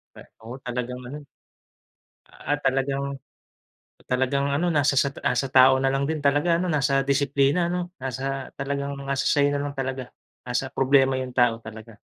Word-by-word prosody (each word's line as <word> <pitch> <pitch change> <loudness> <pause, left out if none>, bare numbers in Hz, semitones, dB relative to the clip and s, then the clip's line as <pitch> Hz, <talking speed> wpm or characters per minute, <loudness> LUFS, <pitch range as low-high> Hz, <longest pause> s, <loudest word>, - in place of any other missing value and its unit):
Kay - - -13 0.2
oo, 120 +3 -7
talagang 125 0 -4
ganun. 145 +3 -8 1.0
Ah, 145 0 -3
talagang 135 0 -1 0.9
talagang 130 +2 +1
ano 165 +5 +1
nasa 145 -2 +2
sa 140 +1 +2
nasa 125 +2 0
tao 130 0 +7
na 135 0 +1
lang 140 +1 0
din 160 -1 -2
talaga 145 +4 +3
ano 180 +2 -1
nasa 135 -2 +2
disiplina, 140 +4 +2
ano? 180 0 -3
Nasa, 135 +1 -4
talagang 140 0 -3
nasa 140 0 -1
sa'yo 145 0 +3
na 145 - -1
lang 145 0 -4
talaga. 130 -1 -4 0.3
Nasa 125 +1 -2
problema 135 0 +3
yung 130 -1 -5
tao 120 -2 +3
talaga. 110 0 -11
135 Hz, 160 wpm, -24 LUFS, 130-145 Hz, 1.0 s, tao